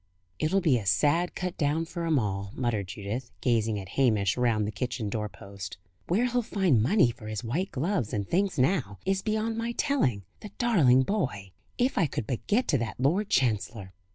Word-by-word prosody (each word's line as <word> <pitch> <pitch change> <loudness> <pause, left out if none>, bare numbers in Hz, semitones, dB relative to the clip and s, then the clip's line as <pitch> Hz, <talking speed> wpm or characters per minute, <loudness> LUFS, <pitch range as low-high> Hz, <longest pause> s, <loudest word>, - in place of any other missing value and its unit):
"It'll 180 +6 +2
be 145 -9 +3
a 105 - -8
sad 150 - +2
cut 180 -1 -4
down 155 +2 +1
for 170 0 -4
'em 160 -2 +3
all," 100 -4 -1
muttered 115 -6 -1
Judith, 105 +6 -5
gazing 110 -3 +1
at 95 -2 -9
Hamish 110 -7 +2
round 115 -4 +1
the 105 - -3
kitchen 120 +1 -3
door 105 0 -2
post. 100 -1 -9 0.3
"Where 210 +8 +2
he'll 245 0 +1
find 190 - +2
money 130 - +4
for 115 -2 -11
his 110 +1 -4
white 165 - -1
gloves 155 - -1
and 100 -2 -2
things 195 +2 0
now, 130 - +1
is 195 0 +1
beyond 220 +2 -1
my 230 +1 -2
telling, 225 - +1 0.2
the 210 - -9
darling 150 - +4
boy! 125 - -2 0.3
If 250 0 +1
I 165 - +3
could 115 - -4
but 120 +1 -4
get 235 +5 +2
to 140 - +3
that 115 -2 -4
Lord 180 +11 +1
Chancellor!" 110 -5 0
130 Hz, 195 wpm, -28 LUFS, -, 0.3 s, money